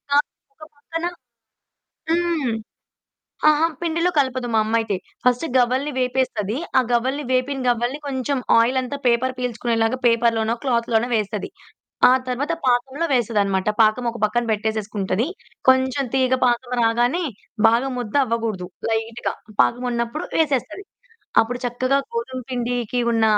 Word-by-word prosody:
ఆ! - - +6 0.6
పక్కన 330 +3 -5 1.1
హ్మ్. 335 -7 0 1.0
ఆహా! 305 +2 +4
పిండిలో 335 +1 +1
కలపదు 260 -3 +1
మా 220 - +4
అమ్మయితే. 220 -2 0 0.3
ఫస్ట్ 250 +5 +3
గవ్వలని 255 +4 +2
వేపేస్తది. 250 -4 -1 0.2
ఆ - - +4
గవ్వలని 260 +5 +1
వేపిన 260 +2 0
తర్వాత, 240 +3 +1
కొంచెం 270 0 -1 0.2
ఆయిలంతా 255 +3 +1
పేపరు 245 +2 +2
పీల్చుకునేలాగా 235 -1 0
పేపరులోనో, 230 -1 +2
క్లాతులోనో 235 -2 +1
వేస్తది. 210 -1 -2 0.6
ఆ - - +6 0.2
తర్వాత 270 +6 -1
పాకంలో 265 +6 +1
వేస్తదన్నమాట. 205 -5 +1
పాకం 215 +3 +3
ఒక 235 - -9
పక్కన 240 +3 +2
పెట్టేసుకుంటది. 215 -1 -1 0.4
కొంచెం 260 +1 +3
తీగ 260 -1 +2
పాకం 245 +1 0
రాగానే, 240 +9 +2 0.4
బాగా 235 +4 +3
ముద్ద 240 0 -5
అవ్వగూడదు, 225 -6 -2 0.2
లైట్‌గా 225 +1 -2 0.3
పాకం 245 +2 +1
ఉన్నప్పుడు 235 +5 -2
వేసేస్తది. 310 - 0 0.6
అప్పుడు 245 +2 -2
చక్కగా 255 +3 +1 0.2
గోధుమ 460 - -3
పిండికి 245 -1 -1
ఉన్న 225 -1 +2
245 Hz, 120 wpm, -22 LUFS, 230-265 Hz, 1.1 s, ఆ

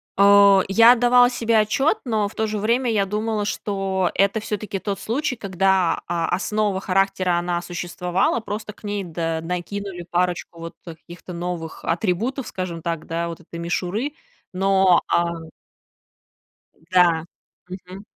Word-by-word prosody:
А. 200 0 +7
Я 230 +4 +7
отдавала 245 0 +5
себе 230 -2 +1
отчёт, 270 - +1
но 215 -4 0
в 200 - -12
то 220 - 0
же 215 0 -3
время 235 +4 +1
я 205 -3 +2
думала, 210 +1 -2
что 195 -3 -1
это 200 +2 +2
всё-таки 210 -2 -4
тот 200 0 -4
случай, 255 +3 -2
когда, 190 -3 +1
а, 170 -1 -1
основа 205 +1 0
характера 190 -2 +1
она 175 0 -1
существовала, 175 +4 -1
просто 215 -1 -6
к - - -24
ней, 205 -1 -3
да, 165 -1 -3
накинули 180 +2 -5
парочку 175 -1 -1
вот, 165 0 -7
э, 165 - -7
каких-то 175 +2 -11
новых 170 -2 -5
атрибутов, 220 +9 -1
скажем 180 -3 -5
так, 165 -1 -3
да, 170 +1 -2
вот 170 -1 -7
этой 170 0 -10
мишуры. 185 - -2 0.4
Но 190 -1 +4
а 170 - +2 1.5
М-да. 170 -1 +2 0.4
Мгм. 185 +2 -10
195 Hz, 145 wpm, -22 LUFS, 175-215 Hz, 1.5 s, А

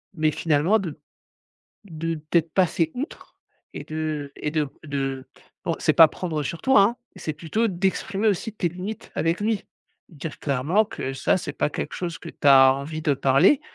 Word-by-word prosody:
Mais 155 -1 +2
finalement, 165 +8 +2
de 160 -6 -6 0.9
de 165 -2 -3
peut-être 160 +1 0
passer 170 -3 +2
outre 280 +6 -7 0.4
et - - -6
de 155 -2 -4
et 150 - -3
de 155 -3 0 0.2
de 135 -2 -3 0.4
bon 165 - -1
c'est 155 - +2
pas 160 +2 +9
prendre 155 -5 -3
sur 165 +4 -5
toi, 265 -6 +5
hein, 225 +5 +3 0.2
c'est 155 - -4
plutôt 175 +9 -1
d'exprimer 195 +2 -1
aussi 215 +3 0
tes 185 -5 -1
limites 185 +6 -7
avec 165 +2 0
lui. 215 -1 0 0.5
Dire 160 -1 -7
clairement 150 +10 +1
que 135 - -5
ça, 135 - +1
c'est - - -5
pas - - 0
quelque - - -5
chose 170 -2 -4
que - - -9
tu 145 - -2
as 135 -1 +8
envie 155 +3 -5
de 145 -2 +2
parler, 135 - +4
160 Hz, 180 wpm, -24 LUFS, 145-185 Hz, 0.9 s, pas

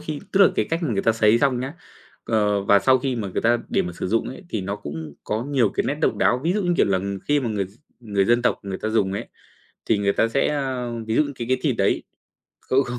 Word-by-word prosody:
khi 155 -2 -5
tức 195 - +3
là 195 - +8
cái - - +1
cách 165 +2 -1
mà 145 -8 0
người 100 - 0
ta 115 - +3
sấy 110 0 +4
xong 130 -2 +1
nhá. 135 +5 -5 0.5
Ờ, 105 -3 +1
và 100 0 +5
sau 130 +5 +4
khi 130 0 -2
mà 105 -4 -3
người 90 - -3
ta 120 +1 +3
để - - +1
mà 90 - -5
sử - - -4
dụng 115 +4 0
ấy 130 - -9
thì 110 - -2
nó 100 +2 -3
cũng 75 -4 -7
có 110 +3 -2
nhiều 135 -6 +2
cái - - 0
nét - - 0
độc - - +1
đáo, 120 - +3
ví 170 - +2
dụ, 205 +1 0
như 175 - +1
kiểu - - +4
là, 95 -1 +2 0.3
khi 145 0 +3
mà 125 - -2
người 105 -3 -1
v 95 - -11 0.3
người 100 -4 0
dân 120 +3 +3
tộc - - +1
người 95 -1 -5
ta - - -3
dùng 100 -3 +1
ấy, 100 - -5 0.6
thì 110 - +2
người 100 0 +1
ta 115 - +2
sẽ, 135 +4 +1
a, 130 -4 -2 0.2
ví 110 - -1
dụ 150 - +4
như 145 - -5
cái 120 -2 -5
cái 130 +1 +2
thịt 140 -6 +1
đấy 100 - +1 0.6
không, 130 +1 +2
không 120 -1 -5
115 Hz, 285 wpm, -23 LUFS, 100-135 Hz, 0.6 s, là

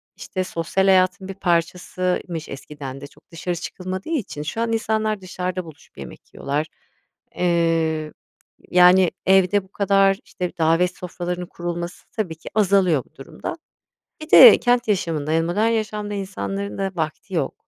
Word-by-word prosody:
işte 185 - -4
sosyal 180 +2 -1
hayatın 190 0 +3
bir 195 - -5
parçasıymış 175 -1 -2
eskiden 135 -1 -8
de 140 - -8
çok - - -25
dışarı 175 +2 -3
çıkılmadığı 185 - -6
için 230 - -3
şu 160 +9 -4
an 230 -1 0
insanlar 220 -2 -1
dışarıda 185 0 -4
buluşup 160 -3 -16
yemek - - -11
yiyorlar. 145 +3 -2 0.7
Eee, 165 -3 +1 0.6
yani, 180 0 +6
evde 190 +1 +4
bu 190 - -22
kadar 195 -1 +3
işte 180 -1 -4
davet 165 +2 +2
sofralarının 180 0 -5
kurulması 175 0 -6
tabii 185 -8 -3
ki 160 - -11
azalıyor 190 - +3
bu - - -31
durumda. 335 - -7 0.7
Bir 310 - -9
de 480 - +10
kent 245 -1 +1
yaşamında, 165 -7 -1
yani, 165 +1 +2
modern 210 +6 +1
yaşamda 210 -2 -2
insanların 200 0 -4
da 195 -1 -1
vakti 165 +3 -4
yok. 145 -5 -1
180 Hz, 145 wpm, -22 LUFS, 165-195 Hz, 0.7 s, de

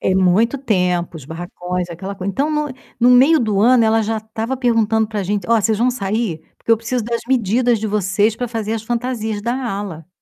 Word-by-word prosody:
É 190 - +1
muito 195 +8 +2
tempo, 180 -8 0
os 140 - -11
barracões, 175 +2 -5
aquela 190 +4 -6
coisa. 195 +1 -4
Então 285 +9 0
no 300 -1 0 0.3
no 245 +1 +5
meio 275 +6 +6
do 210 -4 0
ano 240 +2 +5
ela 225 0 +3
já 220 +1 -1
estava 220 +4 -4
perguntando 225 -3 +1
para 210 -2 -3
gente: 205 +3 -2
"Ó, 230 -1 +5
vocês 215 0 +1
vão 245 +2 +3
sair? 210 -6 -2 0.2
Porque 230 - -1
eu 225 - +5
preciso 235 +1 -2
das 235 +1 -2
medidas 240 -1 +2
de 220 - -2
vocês 205 +1 +1
para 245 +1 -3
fazer 225 -1 -3
as 225 - -4
fantasias 230 -3 -2
da 240 +3 -1
ala". 200 - -5
220 Hz, 210 wpm, -19 LUFS, 195-240 Hz, 0.3 s, meio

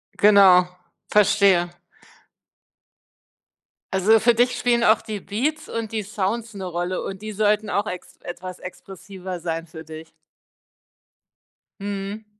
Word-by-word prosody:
Genau, 195 -3 +6 0.4
verstehe. 195 -3 +4 2.2
Also 205 +4 +4
für 240 +2 +4
dich 245 +2 +2
spielen 240 -1 +2
auch 220 -1 +4
die 215 -3 -6
Beats 300 +10 -3
und 225 -1 -4
die 220 - -1
Sounds 210 +3 -3
'ne 195 -2 -6
Rolle 175 +1 -3
und 195 +1 -6
die 215 0 -6
sollten 210 0 +1
auch 205 +1 -1
ex 180 -4 -8
etwas 180 +1 -8
expressiver 185 0 -9
sein 165 -1 -4
für 160 -1 -11
dich. 160 0 -10 1.7
Mhm. 200 +1 -5
200 Hz, 120 wpm, -23 LUFS, 180-215 Hz, 2.2 s, Genau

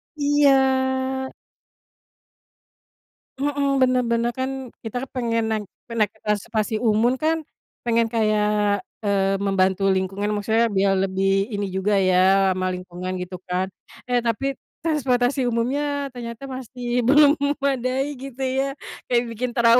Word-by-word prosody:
Iya. 265 -2 +2 2.1
Mhm, 280 0 0
benar 255 -1 +3
benar, 235 +1 +1
kan 260 -1 -4
kita 245 +4 -4
pengen 230 -3 0
naik 215 -2 -2 0.3
naik 215 -3 +2 0.2
transportasi 215 +1 -1
umum 230 +2 +3
kan, 320 0 0 0.4
pengen 230 -1 +2
kayak, 210 -2 +1 0.2
eee, 195 -1 +2
membantu 195 -1 +1
lingkungan, 195 +3 -1
maksudnya 220 +3 +2
biar 195 0 +2
lebih 195 +1 +1
ini 200 0 -1
juga 190 +2 0
ya, 190 +1 +4
ramah 185 0 -1
lingkungan 180 0 -6
gitu 180 0 -6
kan. 180 +1 0 0.4
Eh 245 - +3
tapi, 270 +4 0 0.2
transportasi 270 -4 +1
umumnya 280 +5 -1
ternyata 235 +2 -7
masih 250 -1 -3
belum 290 +2 +6
memadai 280 -1 -1
gitu 265 0 -10
ya, 265 +1 0 0.4
kayak 240 0 +4
bikin 240 +2 -3
trauma. 235 0 +5
235 Hz, 120 wpm, -23 LUFS, 200-265 Hz, 2.1 s, belum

